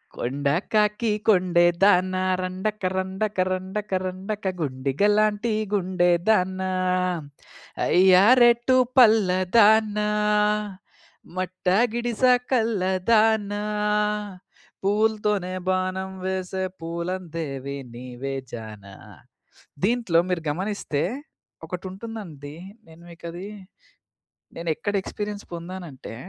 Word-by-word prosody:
కొండ 140 +4 -3 0.3
కాకి 210 +1 +2 0.2
కొండే 180 -4 +4 0.2
దాన 185 -2 +4 0.3
రండక 190 +4 -3
రండక 190 +2 -2
రండక 190 +3 -4
రండక, 195 +3 -5
గుండిగలాంటి 205 - +1 0.2
గుండే 185 -2 +1 0.2
దాన, 190 -3 +2 1.3
అయ్యా 185 +1 +5 0.2
రెట్టు 240 +2 +5 0.2
పల్లదానా, 210 -1 +4 1.3
మట్ట 185 0 -5 0.3
గిడిస 240 0 -3 0.3
కల్లదానా, 215 -1 +2 1.2
పూవ్వు‌లతోనే 210 -2 +1
బాణం 185 0 -1
వేసే 190 0 -2 0.2
పూలం 170 +3 -4
దేవి 140 -3 -4 0.2
నీవే 125 +2 -6 0.2
జానా 105 -4 -9 0.9
దీంట్లో 225 -6 +2
మీరు 180 -2 -1
గమనిస్తే 180 -3 -2 0.6
ఒకటుంటుందండి. 185 -5 -8 0.3
నేను 160 +1 -16
మీకది 170 +3 -8 1.1
నేనేక్కడ 170 +5 -2
ఎక్స్‌పీరియన్స్ 210 0 -5
పొందానంటే 170 -8 -8
185 Hz, 75 wpm, -24 LUFS, 170-210 Hz, 1.3 s, అయ్యా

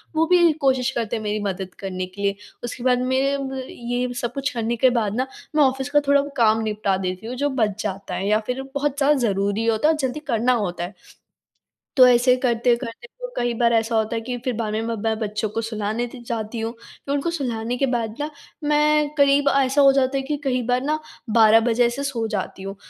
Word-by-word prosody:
वो 320 +1 +3
भी 345 -2 +5
कोशिश 260 -1 +2
करते 235 -3 -2
हैं 220 - -4
मेरी 210 0 -1
मदद 190 -2 -4
करने 185 -2 -4
के 200 - -7
लिए। 200 0 +1 0.3
उसके 240 +1 -6
बाद 250 -1 +3
मेरे 275 +2 +2
ब 270 -1 -4
ये 245 +1 -3
सब 240 0 -3
कुछ 275 0 -1
करने 230 0 -1
के 255 +2 +4
बाद 215 -2 0
ना, 255 +2 0 0.3
मैं 300 - +6
ऑफ़िस 265 +1 0
का 295 0 +4
थोड़ा 280 0 +5 0.2
काम 220 -1 +4
निपटा 210 -3 0
देती 185 +3 -4
हूँ 250 - -4
जो 285 +3 0
बच 220 -5 -1
जाता 195 -1 -4
है 195 - -2
या 215 +1 +3
फिर 250 +2 -2
बहुत 285 0 -1
ज़्यादा 290 +1 +4
ज़रूरी 205 0 0
होता 225 +5 +2
है 320 - +5
और - - -3
जल्दी 265 +2 -2
करना 240 +1 +2 0.2
होता 175 0 -5
है। 180 +4 -6 1.0
तो 255 -2 +8
ऐसे 250 +1 +5
करते-करते 240 0 0
वो - - -5
कई 240 0 0
बार 235 0 +2
ऐसा 225 0 +1
होता 220 +1 0
है 225 - -2
कि 245 +1 -4
फिर 255 - 0
बाद 215 -2 -2
में 220 - -1
मैं 230 0 -2
ब 225 -1 +1
बच्चों 210 0 -2
को 225 +2 -3
सुलाने 220 +1 -2
त 245 - -10
जाती 225 0 -3
हूँ। 225 +1 -2
फिर 275 +4 -7
उनको 285 +4 -1
सुलाने 245 -6 -2
के 275 - +2
बाद 230 -4 -2
ना, 295 - -2 0.3
मैं 300 0 +3
करीब 280 0 +4
ऐसा 270 +1 +3
हो 275 - +7
जाता 270 0 +1
है - - 0
कि 295 +2 -2
कई 255 -2 0
बार 250 0 +2
ना 305 +2 0 0.3
12 220 0 +6
बजे 235 +1 +2
से 275 +4 -4
सो 245 -5 -2
जाती 195 -2 -4
हूँ। 195 +1 -6
240 Hz, 230 wpm, -22 LUFS, 220-270 Hz, 1.0 s, तो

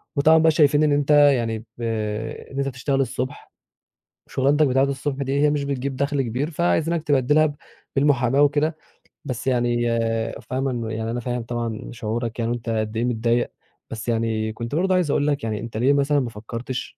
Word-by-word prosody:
وطبعًا 155 +3 +5
بقى 160 0 +5
شايفين 150 -1 +4
إن 150 - +3
أنت 145 0 +1
يعني 130 -7 +4
ب 120 +1 -15 0.7
إن 135 - -8
أنت 140 - 0
بتشتغل 135 +1 -1
الصبح 130 +2 -4 0.8
وشُغلاتك 140 +3 +2
بتاعة 135 +1 +3
الصبح 140 0 -2
دي 135 +1 -1
هي 150 - +5
مش 145 -1 0
بتجيب 140 -1 -3
دَخْل 140 0 0
كبير، 130 +7 -2
فعايزينك 165 0 +1
تبدِّلها 145 +1 +3
ب 145 -1 -2 0.4
بالمُحاماة 135 -1 +3
وكده، 150 +2 +2 0.5
بس 125 0 -4
يعني 120 -2 +2 0.6
فاهمه 130 +1 -2
إنه 115 -2 -3
يعني 110 +1 -3
أنا 120 - -2
فاهم 120 0 -3
طبعًا 115 -2 -4
شعورك 115 +1 -4
يعني 115 0 0
وإن 120 - 0
أنت 115 0 -7
قد 110 0 -1
إيه 115 - 0
متضايق، 120 0 0 0.4
بس 115 +1 -5
يعني 110 -1 0
كنت 115 +4 -5
برضه 185 +3 +2
عايز 170 -6 +1
أقول 145 - +1
لك 145 -4 0
يعني 110 -2 -2
أنت 115 -1 -6
ليه 130 +5 +3
مثلًا 140 +1 +2
ما 125 -3 -2
فكّرتش 115 +4 -6
130 Hz, 185 wpm, -23 LUFS, 115-145 Hz, 0.8 s, وطبعًا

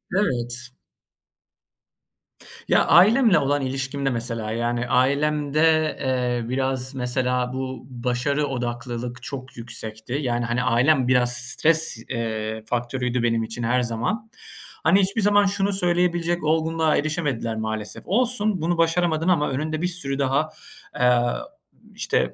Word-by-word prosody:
Evet. 125 - -1 2.0
Ya, - - +4
ailemle 215 +1 +6
olan 145 0 0
ilişkimde 135 +1 -2
mesela, 115 -3 -3
yani, 120 +1 -1
ailemde, 150 +4 +2
eee, 125 -3 -1
biraz 130 0 -1
mesela 125 0 -1
bu, 130 -1 -5
başarı 125 +4 -1
odaklılık 120 -1 -4
çok 130 -2 -7
yüksekti. 115 -1 -7
Yani, 120 -2 -1
hani, 120 +2 -1
ailem 125 +2 +3
biraz 125 -1 +3
stres, 145 +4 +1
eee, 110 -2 -3
faktörüydü 120 +1 -2
benim 115 -1 +1
için 115 +2 -5
her 125 +2 +2
zaman. 125 - -2 0.5
Hani, 170 +5 +5
hiçbir 200 +3 0
zaman 205 0 +4
şunu 200 0 0
söyleyebilecek 175 -2 0
olgunluğa 160 0 +1
erişemediler 145 -7 -1
maalesef; 110 -1 -4
"Olsun, 215 -3 +1
bunu 170 +1 0
başaramadın 165 -1 +1
ama 155 -5 +2
önünde 155 +4 -2
bir 180 - +1
sürü 140 -6 -4
daha" 140 +3 +1 0.5
eee, 125 -1 +4 0.8
işte, - - 0
130 Hz, 120 wpm, -23 LUFS, 120-160 Hz, 2.0 s, ailemle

